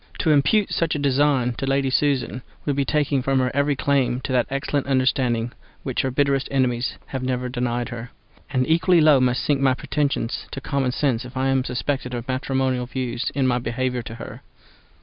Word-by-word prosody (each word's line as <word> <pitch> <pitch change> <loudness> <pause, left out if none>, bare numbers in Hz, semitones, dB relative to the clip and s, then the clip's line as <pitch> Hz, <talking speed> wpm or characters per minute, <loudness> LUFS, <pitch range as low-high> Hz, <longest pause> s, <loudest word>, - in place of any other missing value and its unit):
To 160 - +2
impute 150 +9 +3
such 165 -2 0
a - - 0
design 140 -3 +2
to 135 - -2
Lady 135 0 +1
Susan 135 -2 +1 0.2
would 145 - 0
be 140 0 +1
taking 145 -2 +1
from 135 +1 +1
her 130 -1 +1
every 140 0 +2
claim 130 -3 +1
to 130 - -4
that 125 -2 +2
excellent 140 0 -2
understanding 130 -3 +1 0.3
which 130 -3 -1
her 135 - -1
bitterest 140 0 +1
enemies 125 -2 0
have 130 - -5
never 125 -1 -2
denied 120 -1 -2
her; 120 0 -7 0.4
and 130 -2 0
equally 170 +2 +4
low 150 -3 +6
must 125 -1 +1
sink 145 -2 +1
my 130 -2 +3
pretensions 140 -4 -2
to - - -4
common 135 -2 -1
sense 130 -3 0
if 125 +1 -9
I 135 +1 +1
am 135 -1 +2
suspected 125 0 -2
of 120 0 -5
matrimonial 130 -1 -1
views 125 -1 -3
in 135 -2 +1
my 125 -1 +2
behaviour 125 +1 -2
to 115 0 -8
her. - - -9
130 Hz, 195 wpm, -23 LUFS, 125-140 Hz, 0.4 s, low